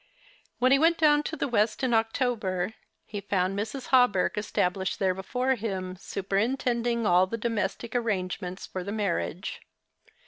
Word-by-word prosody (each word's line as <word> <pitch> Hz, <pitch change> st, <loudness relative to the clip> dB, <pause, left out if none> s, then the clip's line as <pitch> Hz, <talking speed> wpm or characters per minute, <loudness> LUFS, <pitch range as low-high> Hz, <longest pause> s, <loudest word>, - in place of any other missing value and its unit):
When 255 Hz, +1 st, +3 dB
he 275 Hz, -, +6 dB
went 330 Hz, +2 st, +4 dB
do^^•n 295 Hz, -2 st, +4 dB
to 320 Hz, -, -3 dB
the 295 Hz, -, -1 dB
west 220 Hz, -1 st, +1 dB
in 255 Hz, -2 st, +2 dB
October 225 Hz, -4 st, 0 dB, 0.3 s
he 205 Hz, -2 st, -6 dB
found 190 Hz, -1 st, 0 dB
Mrs. 220 Hz, +6 st, -4 dB
Hawberk 245 Hz, -8 st, +4 dB
established 190 Hz, -2 st, -1 dB
there 190 Hz, -2 st, +2 dB
before 250 Hz, +8 st, -1 dB
him, 190 Hz, -6 st, -4 dB
superintend 230 Hz, +6 st, -1 dB
ing 235 Hz, -1 st, 0 dB
all 180 Hz, 0 st, +5 dB
the 230 Hz, -, -3 dB
domestic 225 Hz, 0 st, -2 dB
arrangements 185 Hz, -5 st, -2 dB
for 185 Hz, -, -5 dB
the 200 Hz, -, -5 dB
marriage. 195 Hz, -3 st, -2 dB
215 Hz, 150 wpm, -27 LUFS, 190-245 Hz, 0.3 s, he